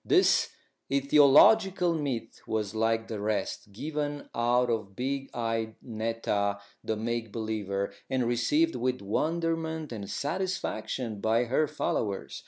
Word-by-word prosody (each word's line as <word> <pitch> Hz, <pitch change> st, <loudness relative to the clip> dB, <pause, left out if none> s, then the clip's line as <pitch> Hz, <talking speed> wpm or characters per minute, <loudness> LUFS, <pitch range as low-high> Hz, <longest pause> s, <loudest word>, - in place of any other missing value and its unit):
This -, -, +4 dB, 0.4 s
aetiological 165 Hz, +7 st, +5 dB
myth 130 Hz, -5 st, -4 dB
was, 105 Hz, -2 st, -1 dB
like 115 Hz, 0 st, +1 dB
the 110 Hz, -, -4 dB
rest, 105 Hz, -1 st, -2 dB
given 145 Hz, +5 st, -4 dB
out 120 Hz, +1 st, +2 dB
by 115 Hz, -2 st, +1 dB
big 135 Hz, +3 st, -2 dB
eyed 115 Hz, -2 st, -2 dB
Netta, 110 Hz, -3 st, -1 dB, 0.2 s
the 110 Hz, -, -1 dB
make 115 Hz, 0 st, -2 dB
believer, 105 Hz, -3 st, -2 dB, 0.2 s
and 130 Hz, -2 st, +1 dB
received 295 Hz, -, +2 dB
with 130 Hz, -4 st, -1 dB
wonderment 160 Hz, +6 st, -1 dB
and 100 Hz, -4 st, -6 dB
satisfaction 130 Hz, -, -2 dB
by 115 Hz, +2 st, +3 dB
her 135 Hz, +6 st, +1 dB
followers. 100 Hz, -7 st, -2 dB
120 Hz, 120 wpm, -29 LUFS, 110-145 Hz, 0.4 s, aetiological